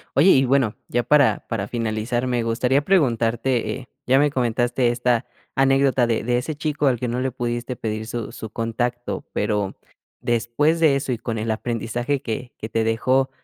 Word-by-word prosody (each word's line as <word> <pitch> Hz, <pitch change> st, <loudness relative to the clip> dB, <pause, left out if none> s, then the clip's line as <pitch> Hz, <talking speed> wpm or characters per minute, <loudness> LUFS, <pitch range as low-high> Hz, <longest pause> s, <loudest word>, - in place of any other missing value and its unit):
Oye 170 Hz, +7 st, +6 dB
y, 135 Hz, 0 st, +5 dB
bueno, 130 Hz, -4 st, +2 dB
ya 120 Hz, 0 st, +1 dB
para 145 Hz, -1 st, +3 dB
para 110 Hz, -4 st, -3 dB
finalizar, 115 Hz, +2 st, -1 dB
me 120 Hz, -2 st, 0 dB
gustaría 125 Hz, +4 st, +1 dB
preguntarte, 120 Hz, -, +1 dB
eh, 130 Hz, -1 st, -7 dB, 0.2 s
ya 130 Hz, +2 st, +4 dB
me 145 Hz, 0 st, +3 dB
comentaste 120 Hz, -1 st, +1 dB
esta 120 Hz, 0 st, +1 dB, 0.3 s
anécdota 135 Hz, -2 st, +3 dB
de 115 Hz, -1 st, 0 dB
de 120 Hz, +2 st, +1 dB
ese 150 Hz, +5 st, -3 dB
chico 150 Hz, -1 st, -1 dB
al 125 Hz, -3 st, +2 dB
que 125 Hz, -, -2 dB
no 120 Hz, +2 st, -2 dB
le 130 Hz, 0 st, -1 dB
pudiste 120 Hz, 0 st, -3 dB
pedir 110 Hz, 0 st, -3 dB
su 115 Hz, 0 st, -5 dB
su 110 Hz, -, -7 dB
contacto, 120 Hz, +2 st, -3 dB
pero 105 Hz, -2 st, -1 dB, 0.4 s
después 120 Hz, +8 st, +1 dB
de 150 Hz, -4 st, +5 dB
eso 135 Hz, -2 st, -2 dB
y -, -, -3 dB
con 115 Hz, -1 st, -3 dB
el 110 Hz, +1 st, -1 dB
aprendizaje 120 Hz, +4 st, -2 dB
que 120 Hz, 0 st, -4 dB
que 110 Hz, -, -6 dB
te 115 Hz, 0 st, 0 dB
dejó, 130 Hz, +4 st, +2 dB
120 Hz, 185 wpm, -22 LUFS, 115-135 Hz, 0.4 s, Oye